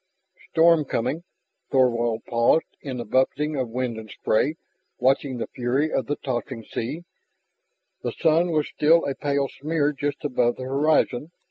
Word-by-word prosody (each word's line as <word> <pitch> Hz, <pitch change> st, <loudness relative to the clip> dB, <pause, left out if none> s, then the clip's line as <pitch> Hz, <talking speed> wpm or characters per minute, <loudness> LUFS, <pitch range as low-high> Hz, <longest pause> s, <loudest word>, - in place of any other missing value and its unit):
"... -, -, -26 dB
storm 165 Hz, -1 st, +5 dB
coming." 135 Hz, +5 st, -2 dB, 0.5 s
Thorvald 120 Hz, -4 st, +2 dB
paused 120 Hz, +7 st, +3 dB, 0.2 s
in 130 Hz, -3 st, -5 dB
the 120 Hz, -, -4 dB
buffeting 140 Hz, +6 st, +1 dB
of 130 Hz, -4 st, -2 dB
wind 120 Hz, -1 st, -2 dB
and 110 Hz, -1 st, -10 dB
spray, 135 Hz, +8 st, 0 dB, 0.4 s
watching 135 Hz, 0 st, +1 dB
the 115 Hz, -, -2 dB
fury 130 Hz, +5 st, -1 dB
of 130 Hz, -, 0 dB
the 145 Hz, -, 0 dB
tossing 120 Hz, -3 st, -4 dB
sea. 145 Hz, +11 st, -5 dB, 1.0 s
The -, -, -2 dB
sun 165 Hz, +1 st, +2 dB
was 155 Hz, -3 st, +1 dB
still 165 Hz, +3 st, +3 dB
a 140 Hz, -, -1 dB
pale 140 Hz, 0 st, 0 dB
smear 150 Hz, +1 st, -1 dB
just 145 Hz, +1 st, -3 dB
above 125 Hz, -4 st, +1 dB
the 130 Hz, -, -7 dB
horizon. 140 Hz, 0 st, +1 dB
135 Hz, 155 wpm, -24 LUFS, 120-150 Hz, 1.0 s, storm